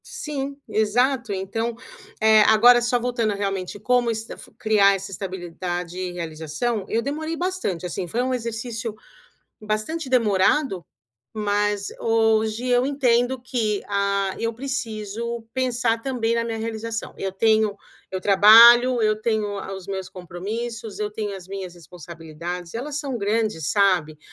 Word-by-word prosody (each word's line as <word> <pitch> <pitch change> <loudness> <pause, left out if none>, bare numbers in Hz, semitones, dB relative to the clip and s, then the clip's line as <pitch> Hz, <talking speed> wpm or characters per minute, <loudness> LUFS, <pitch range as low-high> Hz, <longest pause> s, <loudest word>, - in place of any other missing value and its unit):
Sim, 295 - -5
exato, 240 +3 +1
então, 210 +5 -3 0.4
eh, 220 0 +6
agora 240 +3 +7
só 240 +1 +1
voltando 235 -3 -1
realmente 195 -1 -3
como 245 +3 +2
estaf 220 0 -6
criar 200 -2 +4
essa 195 +1 -7
estabilidade 180 -2 -5
e 185 -1 -3
realização, 170 +6 -3
eu 230 +1 0
demorei 315 +4 -3
bastante 355 - -2
assim, 180 +1 -4
foi 235 +8 -1
um 260 0 -1
exercício 230 -1 -4 0.7
bastante 215 +9 -3
demorado, 210 - +2 0.5
mas 205 -1 0
hoje 225 +1 +1
eu 245 0 +3
entendo 260 -2 +1
que, 230 -5 -1
ah, 200 -1 0
eu 230 0 -1
preciso 235 -2 -4
pensar 245 -3 0
também 235 -3 -1
na 230 0 0
minha 230 -1 -3
realização. 225 0 -4
Eu 195 - -2
tenho, 215 0 +2 0.3
eu 185 - -3
trabalho, 230 +5 +8
eu 215 0 +1
tenho 220 -2 0 0.3
os 190 -1 -10
meus 190 -2 -4
compromissos, 210 +5 -6
eu 210 0 -2
tenho 210 -2 -4
as 185 -2 -11
minhas 190 -2 -6
responsabilidades, 170 0 -8
elas 285 +5 -4
são 280 -4 -3
grandes, 210 -7 -1
sabe? 180 -7 +2
220 Hz, 135 wpm, -23 LUFS, 195-240 Hz, 0.7 s, trabalho